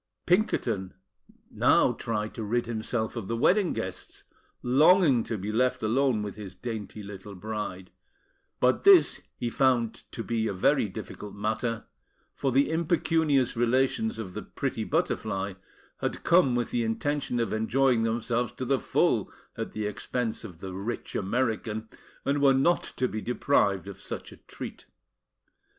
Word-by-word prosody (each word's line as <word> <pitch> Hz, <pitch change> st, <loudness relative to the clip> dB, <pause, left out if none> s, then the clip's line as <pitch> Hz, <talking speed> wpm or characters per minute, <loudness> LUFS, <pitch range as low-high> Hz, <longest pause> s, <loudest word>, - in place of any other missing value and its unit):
Pinkerton 115 Hz, -, +1 dB, 0.6 s
now -, -, +4 dB
tried 105 Hz, -2 st, -3 dB
to 115 Hz, -, -5 dB
rid 120 Hz, +3 st, 0 dB
himself 110 Hz, 0 st, -2 dB
of 115 Hz, -5 st, -4 dB
the 115 Hz, -, -2 dB
wedding 185 Hz, -, +3 dB
guests, -, -, -5 dB, 0.4 s
longing 145 Hz, 0 st, +5 dB
to 115 Hz, -, -3 dB
be 100 Hz, +2 st, -4 dB
left 125 Hz, +2 st, +1 dB
alone 120 Hz, 0 st, +2 dB
with 105 Hz, -2 st, -5 dB
his 100 Hz, -3 st, -8 dB
dainty 110 Hz, -1 st, -6 dB
little 100 Hz, 0 st, -9 dB
bride; 95 Hz, -2 st, -5 dB, 0.7 s
but -, -, +3 dB
this 395 Hz, -3 st, +6 dB, 0.2 s
he 120 Hz, -, -2 dB
found 120 Hz, -3 st, +2 dB, 0.2 s
to 115 Hz, -, -5 dB
be 115 Hz, -1 st, -1 dB
a 105 Hz, -, -1 dB
very 105 Hz, +4 st, +2 dB
difficult 100 Hz, +2 st, -8 dB
matter, 110 Hz, +2 st, -2 dB, 0.5 s
for 135 Hz, -, -1 dB
the 140 Hz, +4 st, +3 dB
impecunious 160 Hz, -5 st, +2 dB
relations 130 Hz, -, +1 dB
of 95 Hz, -5 st, -6 dB
the -, -, -4 dB
pretty -, -, -3 dB
Butterfly 95 Hz, -2 st, -1 dB, 0.5 s
had -, -, -3 dB
come 170 Hz, -8 st, +4 dB
with 120 Hz, -1 st, -1 dB
the 120 Hz, -, +1 dB
intention 125 Hz, +3 st, -1 dB
of 115 Hz, -, -1 dB
enjoying 120 Hz, +2 st, +2 dB
themselves 115 Hz, +1 st, 0 dB
to 130 Hz, -, -5 dB
the 135 Hz, +1 st, +2 dB
full -, -, +1 dB, 0.2 s
at -, -, -4 dB
the 110 Hz, -1 st, -3 dB
expense 115 Hz, +3 st, -3 dB
of 90 Hz, -6 st, -10 dB
the 95 Hz, -1 st, -6 dB
rich 100 Hz, +6 st, -5 dB
American, 110 Hz, 0 st, -1 dB, 0.4 s
and 140 Hz, +1 st, +1 dB
were 135 Hz, -1 st, +6 dB
not 165 Hz, +6 st, +3 dB, 0.2 s
to 130 Hz, -, +2 dB
be 110 Hz, -2 st, -4 dB
deprived 105 Hz, -7 st, +1 dB
of 100 Hz, -, -9 dB
such -, -, -6 dB
a -, -, -13 dB
treat. -, -, -9 dB
115 Hz, 155 wpm, -28 LUFS, 105-135 Hz, 0.7 s, this